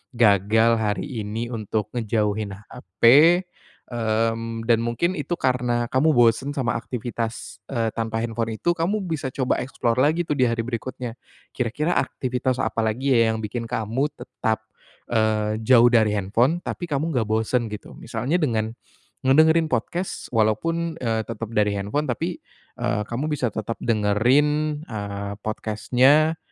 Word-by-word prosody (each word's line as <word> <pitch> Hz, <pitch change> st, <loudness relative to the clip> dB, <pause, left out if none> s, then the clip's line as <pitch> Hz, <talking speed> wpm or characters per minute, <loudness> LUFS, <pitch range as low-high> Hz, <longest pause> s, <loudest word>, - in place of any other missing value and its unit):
gagal 110 Hz, +1 st, +4 dB
hari 110 Hz, +4 st, -2 dB
ini 115 Hz, +3 st, -4 dB
untuk 110 Hz, -2 st, -3 dB
ngejauhin 105 Hz, -3 st, -1 dB
HP, 100 Hz, -1 st, -15 dB, 0.9 s
mmm, 115 Hz, 0 st, -1 dB
dan 115 Hz, 0 st, +3 dB
mungkin 120 Hz, +10 st, 0 dB
itu 150 Hz, +5 st, -2 dB
karena 125 Hz, -4 st, 0 dB
kamu 150 Hz, +4 st, +3 dB
bosen 120 Hz, +4 st, +3 dB
sama 125 Hz, -3 st, 0 dB
aktivitas, 115 Hz, -2 st, -5 dB
eee, 115 Hz, -4 st, -1 dB
tanpa 115 Hz, 0 st, -2 dB
handphone 115 Hz, -1 st, -2 dB
itu, 175 Hz, +10 st, 0 dB
kamu 185 Hz, +5 st, -1 dB
bisa 160 Hz, -7 st, -3 dB
coba 130 Hz, -2 st, 0 dB
explore 125 Hz, -1 st, -1 dB
lagi 155 Hz, +5 st, +3 dB
tuh 150 Hz, -3 st, -2 dB
di 125 Hz, -1 st, +4 dB
hari 115 Hz, 0 st, -1 dB
berikutnya. 120 Hz, 0 st, -5 dB, 0.3 s
Kira-kira 130 Hz, +7 st, -1 dB
aktivitas 130 Hz, 0 st, -1 dB
apa 110 Hz, +1 st, -2 dB
lagi 130 Hz, +6 st, 0 dB
ya, 115 Hz, -2 st, +4 dB
yang 110 Hz, -, -4 dB
bikin 115 Hz, +2 st, -4 dB
kamu 115 Hz, +4 st, -1 dB
tetap, 115 Hz, -4 st, -3 dB, 0.5 s
eee, 110 Hz, -1 st, +1 dB
jauh 120 Hz, +1 st, +5 dB
dari 110 Hz, -3 st, +3 dB
handphone 120 Hz, -, +1 dB
tapi 175 Hz, -, -4 dB
kamu 150 Hz, +3 st, -1 dB
enggak 115 Hz, -5 st, 0 dB
bosen, 110 Hz, +2 st, 0 dB
gitu. 105 Hz, -1 st, -8 dB
Misalnya 120 Hz, +9 st, -1 dB
dengan 110 Hz, -8 st, 0 dB, 0.6 s
ngedengerin 160 Hz, +4 st, +5 dB
podcast, 170 Hz, +10 st, -3 dB
walaupun, 160 Hz, +10 st, 0 dB
eee, 115 Hz, -2 st, 0 dB
tetap 115 Hz, -1 st, -5 dB
dari 105 Hz, -2 st, +2 dB
handphone, 105 Hz, +10 st, -2 dB
tapi, 165 Hz, +8 st, -3 dB, 0.4 s
eee, 105 Hz, -, 0 dB
kamu 130 Hz, +6 st, -2 dB
bisa 130 Hz, -5 st, 0 dB
tetap 110 Hz, +1 st, -4 dB
dengerin, 135 Hz, +8 st, +2 dB
eee, 100 Hz, -3 st, -5 dB
podcast-nya, 130 Hz, +9 st, +2 dB
115 Hz, 145 wpm, -23 LUFS, 110-135 Hz, 0.9 s, jauh